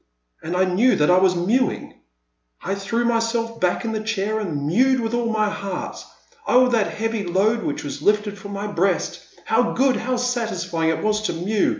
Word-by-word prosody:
And 175 +3 -3
I 185 - +4
knew 195 +8 +3
that 150 +3 +3
I 180 - +6
was 185 -1 +3
mewing! 220 +9 0 0.7
I - - -2
threw 215 +5 -1
myself 230 0 0
back 180 +5 +1
in 225 - -1
my 220 - -2
chair 215 0 -1
and 155 -9 -3
mewed 255 - +3
with 225 -1 -2
all 240 -1 0
my 215 -1 +1
heart. 200 -3 -5 0.4
Oh, 255 0 +5
that 230 -4 0
heavy 225 -1 -2
load 200 +6 +1
which 145 - -3
was 145 0 -6
lifted 210 +2 +1
from 200 +1 -9
my 200 +1 -4
breast! 195 -2 0 0.3
How - - +2
good, 265 -1 +2
how 255 +2 -1
satisfying 185 -10 -1
it 160 - -1
was 215 0 +1
to - - -2
mew 195 +5 0
210 Hz, 195 wpm, -22 LUFS, 185-230 Hz, 0.7 s, I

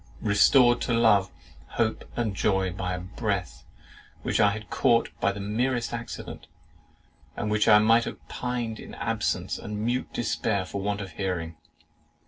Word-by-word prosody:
Restored 120 +4 +5
to 120 - 0
love, 105 -5 +4 0.5
hope, 110 -1 0
and 110 -4 -1
joy, 95 -2 +1
by 90 -1 -3
a - - -5
breath 95 0 -4 0.6
which - - 0
I 105 - +6
had 105 +1 -6
caught 115 0 +2
by - - +2
the 100 - -7
merest 120 +5 -1
accident, 120 0 -7 0.9
and 105 - -2
which 105 0 +2
I 105 - +8
might 115 +2 +4
have - - -8
pined 120 -3 -3
in - - -10
absence - - -2
and 105 0 -5
mute 125 +2 -1
despair 110 -4 -1
for 100 +1 -5
want 100 +1 -2
of 95 -3 -7
hearing! 85 -3 -3
105 Hz, 155 wpm, -26 LUFS, 100-115 Hz, 0.9 s, I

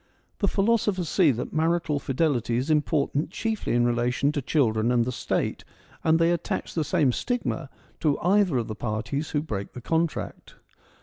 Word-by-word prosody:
The 200 - +2
philosophers 200 -4 +1
see 175 -3 +4
that 125 -2 -2
marital 160 -2 +1
fidelity 130 -5 0
is 135 +6 -1
im 150 -1 +4
portant 145 0 -1
chiefly 220 +3 -2
in 120 0 +3
relation 120 +4 +1
to 145 - -2
children 120 -5 +1
and 120 -1 +3
the 125 - -2
State, - - -2 0.4
and 160 0 +4
they 165 +1 +3
attach 170 -1 -2
the 160 - 0
same 150 -3 +2
stigma 165 - -2 0.3
to 150 -3 +2
either 185 -5 +3
of 115 - -1
the 110 - -4
parties 120 +7 -3
who 145 -1 -1
break 100 -9 -5
the - - -7
contract. 165 +4 -2
150 Hz, 175 wpm, -26 LUFS, 125-170 Hz, 0.4 s, see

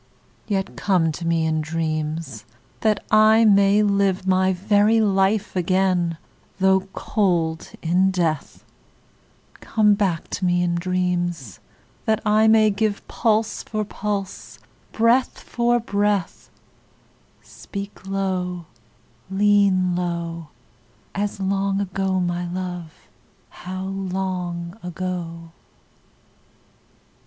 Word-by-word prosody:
Yet 195 -2 -2
come 180 -5 +1
to 165 +2 -5
me 165 -1 +1
in 155 0 0
dreams, 155 -5 -3 0.4
that 215 -2 0
I 215 +1 +6
may 200 0 +5
live 200 -2 +1
My 190 0 +3
very 205 +4 +3
life 200 0 +1
again 180 -2 +1 0.4
though 190 0 +3
cold 170 -6 0
in 180 +3 +3
death: 170 -5 -2 0.9
Come 215 -2 +3
back 190 -5 -1
to - - -5
me 175 -1 +2
in 175 -1 0
dreams, 175 - -2 0.5
that 220 -1 +2
I 215 +1 +4
may 220 -1 +5
give 210 0 -2
Pulse 225 -1 0
for 215 -1 -3
pulse, 200 -2 -5 0.3
breath 235 +3 +2
for 240 0 0
breath: 205 -4 -1 0.9
Speak 200 -1 -9
low, 185 -3 -2 0.6
lean 195 -2 +3
low, 170 -2 -3 0.7
As 205 0 -3
long 195 0 0
ago, 195 -1 -1
my 175 0 -2
love, 180 -3 -6 0.4
how 185 +1 -7
long 185 -2 -4
ago! 170 -2 -5
190 Hz, 100 wpm, -22 LUFS, 175-205 Hz, 0.9 s, I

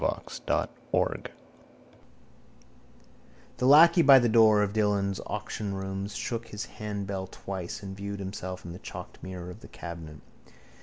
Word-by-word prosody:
The - - -1 3.0
lacquey 165 +5 +8
by 140 -4 +9
the 120 -2 +4
door 110 -2 +6
of 100 0 -2
Dillon's 100 -2 +1
auctionrooms 95 0 -4
shook 115 -1 -3
his 105 +1 -5
handbell 100 -4 -5
twice 95 +2 -6
again 100 - -6
and 95 - -8
viewed 100 0 -5
himself 95 -2 -6
in 85 - -6
the 90 - -9
chalked - - -9
mirror 90 -1 -7
of 100 - -11
the - - -12
cabinet. 80 -4 -9
100 Hz, 130 wpm, -28 LUFS, 95-110 Hz, 3.0 s, by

